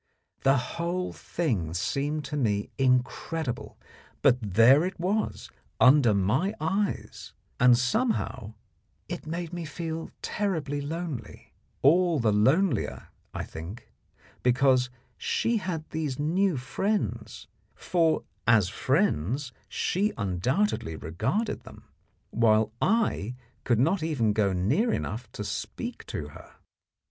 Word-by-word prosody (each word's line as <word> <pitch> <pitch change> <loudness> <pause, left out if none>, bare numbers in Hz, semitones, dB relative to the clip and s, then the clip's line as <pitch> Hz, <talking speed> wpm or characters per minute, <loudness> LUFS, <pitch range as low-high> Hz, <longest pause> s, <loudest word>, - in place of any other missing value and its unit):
The 135 +1 +4
whole 170 +8 -2
thing 100 - -2
seemed 145 - -1
to - - -4
me 105 -7 0
incredible, 130 +2 0 0.5
but 125 -3 +5
there 130 +7 +7
it 185 0 -4
was 200 +5 -1 0.3
under 130 -5 +6
my 130 - +1
eyes, 195 +6 -2 0.3
and, 125 -1 +6
somehow, 130 - -1 0.5
it - - -6
made 170 +1 -4
me 175 -1 -4
feel 160 +1 -5
terribly 160 -8 -1
lonely 160 -2 -6 0.3
all 170 +2 +4
the 115 -3 +3
lonelier, 130 - +2 0.2
I - - -4
think, 85 +8 -9 0.5
because 125 0 +3 0.3
she 230 0 +1
had 180 -6 -4
these 155 -5 -2
new 170 +3 +1
friends; 195 +12 -2 0.3
for 165 -3 +1 0.2
as 110 -6 +5
friends 130 - 0 0.2
she 205 +4 0
undoubtedly 105 - 0
regarded 110 - -2
them, - - -13 0.5
while 110 -1 +3
I 190 - +1 0.3
could 120 -3 +2
not 165 +8 +2
even 135 -10 +1
go 105 -2 +2
near 105 - +1
enough 110 +1 -3
to 105 - -5
speak 100 - -5
to 75 -1 -5
her. - - -14
140 Hz, 115 wpm, -27 LUFS, 115-175 Hz, 0.5 s, there